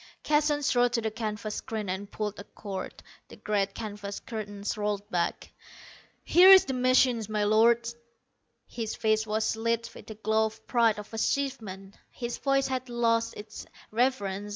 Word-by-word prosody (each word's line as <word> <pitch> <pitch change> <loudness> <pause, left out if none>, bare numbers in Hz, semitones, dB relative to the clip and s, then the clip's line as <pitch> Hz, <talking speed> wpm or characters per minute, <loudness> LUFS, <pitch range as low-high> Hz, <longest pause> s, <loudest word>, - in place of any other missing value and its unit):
Keston 295 -1 +2
strode 245 -2 +2
to 235 - +1
the 220 -1 -2
canvas 215 -1 -4
screen 215 -2 -4
and 190 +2 -4
pulled 210 -1 -4
a - - -7
cord. 195 -2 -7 0.2
The - - -12
great 200 -2 -1
canvas 205 -2 -6
curtains 205 -3 -5
rolled 205 -1 -2
back. 175 -1 -2 0.7
"Here 365 +2 +7
is 385 -1 +9
the 265 - -3
machine, 255 -1 +3
my 210 -1 0
Lords!" 235 +3 +3 0.7
His 225 -2 -5
face 220 0 +1
was 220 +1 0
lit 230 +1 -1
with - - -13
the 220 - -8
glow 220 +1 +1
of 220 - -13
pride 230 -3 +2
of 210 +1 -9
achievement. 220 -6 -3
His 240 -1 -5
voice 275 -1 +2
had 260 -1 -3
lost 230 -1 +1
its 210 +1 -9 0.2
reverence. 210 -4 0
220 Hz, 160 wpm, -28 LUFS, 210-240 Hz, 0.7 s, is